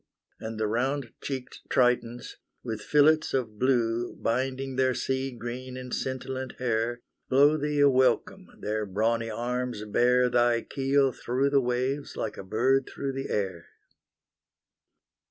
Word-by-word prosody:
And 110 0 -6
the 110 - +1
round 125 +4 -1
cheeked 130 -3 -5
Tritons, 125 -1 +1 0.3
with 110 -3 -4
fillets 150 +2 +3
of 110 -5 -2
blue 120 -2 +1
Binding 130 +2 -2
their 130 -1 +2
sea 135 0 -1
green 125 +2 -6
and 125 -1 -7
scintillant 130 0 -3
hair, 120 -1 -1 0.3
Blow 145 +3 +5
thee 150 -1 -1
a 145 - +7
welcome; 130 -1 +2
their 105 0 -2
brawny 115 +4 0
arms 120 0 -3
bear 125 +4 +3
Thy 120 -1 +3
keel 135 0 +1
through 130 +3 -1
the 140 -1 +4
waves 130 +3 -2
like 110 - -3
a - - -7
bird 130 +7 +1
through 135 -1 -3
the 135 0 -4
air. 95 -5 -2
125 Hz, 135 wpm, -27 LUFS, 115-135 Hz, 0.3 s, a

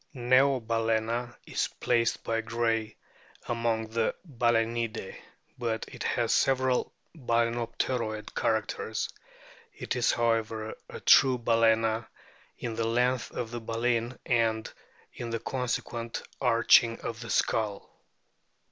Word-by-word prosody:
Neobal&na 120 -2 +1
is - - -1
placed 115 -1 +1
by 115 0 0
Gray 115 -1 -1 0.5
among 115 -2 -1
the 115 0 0
Balsenidae; 115 -4 0 0.4
but 115 -2 -2
it - - -11
has - - +1
several 130 -1 +2 0.2
Balaenopteroid 115 -3 -1
characters. 110 -1 -1 0.7
It - - -3
is, - - +3
however, 115 -2 0 0.2
a - - -7
true 130 -2 +6
Balana 115 -1 +2 0.5
in 115 - -4
the 115 0 -1
length 125 +2 +1
of 115 -2 -5
the 120 -1 -5
baleen 115 +1 -1
and 115 -2 +1 0.4
in 120 - -6
the 115 0 -2
consequent 120 -2 -3 0.2
arching 115 -1 +5
of 115 -1 -5
the 115 0 -8
skull. 105 -3 0
115 Hz, 110 wpm, -29 LUFS, 115-120 Hz, 0.7 s, true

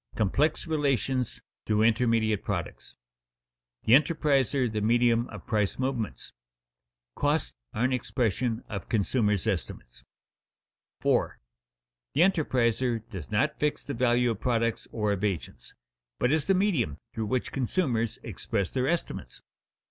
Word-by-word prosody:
Complex 140 +9 +1
Relations 135 - 0 0.2
Through 105 0 +3
Intermediate 115 -2 +2
Products_] - - -4
[Sidenote: - - -54 0.9
The 110 - +4
enterpriser 140 -4 +3
the 105 - -1
medium 120 +2 +3
of - - -10
price 105 -4 0
movements] 130 -5 -2
[Sidenote: - - -21
Costs 145 +1 +1 0.2
are 110 - 0
an 130 +1 +2
expression 120 -1 -1
of 100 -4 -6
consumers' 105 -2 +1
estimates] 95 - -4 1.0
4. - - +1 0.8
_The 150 - +4
enterpriser 120 - 0
does 95 -4 -7
not 120 +9 0
fix 150 0 0
the 140 - -5
value 120 -1 +2
of 110 - -4
products 115 -2 0
or 105 -2 0
of 100 0 -2
agents, 80 -11 -3 0.4
but 125 - +1
is 155 -1 +2
the 195 - +3
medium 165 - +1 0.2
through 110 -2 -3
which 125 +3 -1
consumers 125 - 0
express 100 -3 -3
their 130 0 0
estimates. 165 - -3
115 Hz, 135 wpm, -28 LUFS, 105-135 Hz, 1.0 s, The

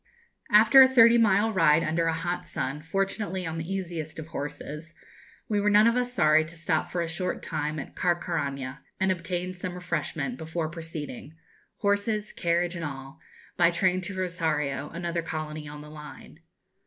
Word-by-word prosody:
After 225 +5 +8
a 260 - +9
thirty 235 -2 +6
mile 220 0 +3
ride 165 -4 +4
under 165 +1 0
a 165 - +2
hot 175 +2 -3
sun, 140 +3 -3
fortunately 190 +2 -2
on 160 0 -4
the 165 +4 -5
easiest 170 -5 -4
of 160 0 -7
horses, 150 +2 -6 0.5
we 205 -2 +1
were 210 - +3
none 210 +1 +6
of 230 +1 +4
us 250 0 0
sorry 155 -8 +4
to 160 +2 -10
stop 160 -1 -1
for 175 - -2
a 170 - -1
short 180 +3 -3
time 155 -1 -2
at 140 - -7
Carcaraña, 150 -6 -1 0.2
and 190 0 +2
obtain 180 +1 -3
some 180 0 -5
refreshment, 155 -7 -3
before 160 0 -3
proceeding 160 -3 -7 0.5
horses, 205 +1 0
carriage, 170 +1 0
and 170 - -5
all 135 0 -7 0.4
by 170 -1 +5
train 185 +1 +1
to 190 +2 -5
Rosario, 155 -6 -1
another 170 0 -3
colony 155 -2 -5
on 150 0 -8
the 150 0 -11
line. 150 -1 -11
170 Hz, 170 wpm, -27 LUFS, 155-185 Hz, 0.5 s, a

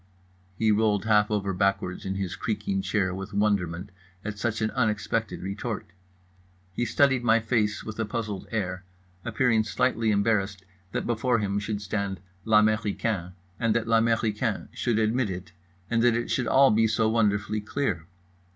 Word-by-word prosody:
_" - - -33 0.5
He 110 -1 +3
rolled 105 -1 +2
half 105 -2 +4
over 100 -2 -1
backwards 100 -1 0
in 95 - -2
his 95 -3 -3
creaking 100 -3 -2
chair 95 -1 0
with 95 +2 -6
wonderment 100 -3 0 0.3
at 105 0 -4
such 110 -1 -1
an 110 0 0
unexpected 110 -3 -1
retort. 95 -2 -4 0.8
He 120 - -1
studied 130 -1 +3
my 115 -1 +4
face 110 -2 0
with 110 0 -7
a 110 - +1
puzzled 105 -3 -4
air, 95 -4 -2 0.4
appearing 115 -1 +2
slightly 115 0 +1
embarrassed 100 -2 +1 0.3
that - - -2
before 120 +1 +1
him 100 -2 -1
should 105 0 -3
stand 100 -1 -2 0.3
l'américain 105 -3 +2 0.3
and 115 -2 +1
that 115 -1 +1
l'américain 115 -1 +1
should 120 -3 -1
admit 110 +1 +1
it, 90 -2 -6 0.4
and 115 +1 +1
that 120 -1 +4
it 120 +1 -2
should 125 - 0
all 135 0 +6
be 110 +1 +4
so 110 0 +1
wonderfully 105 -1 +1
clear. 105 - -2
105 Hz, 160 wpm, -27 LUFS, 100-115 Hz, 0.8 s, all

